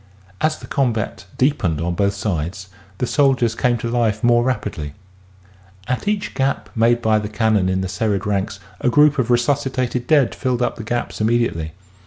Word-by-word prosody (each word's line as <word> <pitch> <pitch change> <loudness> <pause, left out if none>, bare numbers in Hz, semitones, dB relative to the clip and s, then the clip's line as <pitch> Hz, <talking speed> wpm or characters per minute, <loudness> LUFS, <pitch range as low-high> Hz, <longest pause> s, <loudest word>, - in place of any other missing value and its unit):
As 155 0 +1
the - - -11
combat 115 -8 -1
deepened 125 - +1
on 85 +2 -1
both 100 +3 +1
sides, 95 -1 -3 0.3
the 125 - 0
soldiers 130 -4 +2
came 120 +1 +1
to 115 - -4
life 115 -2 0
more 120 0 +5
rapidly.... 105 - -3 0.9
At 130 +10 -2
each 210 0 -1
gap 135 0 -1
made 120 +1 +3
by 110 -1 +3
the 105 -1 -5
cannon 105 -3 +1
in 95 0 0
the 95 - -2
serried 105 0 -1
ranks 100 -2 -1 0.2
a - - +2
group 145 +2 +4
of 125 -1 0
resuscitated 125 -1 0
dead 145 -5 +4
filled 125 -2 -1
up - - -1
the 115 - -6
gaps 120 +2 -3
immedi 115 +2 +2
ately. 80 -1 -5
115 Hz, 180 wpm, -20 LUFS, 100-130 Hz, 0.9 s, more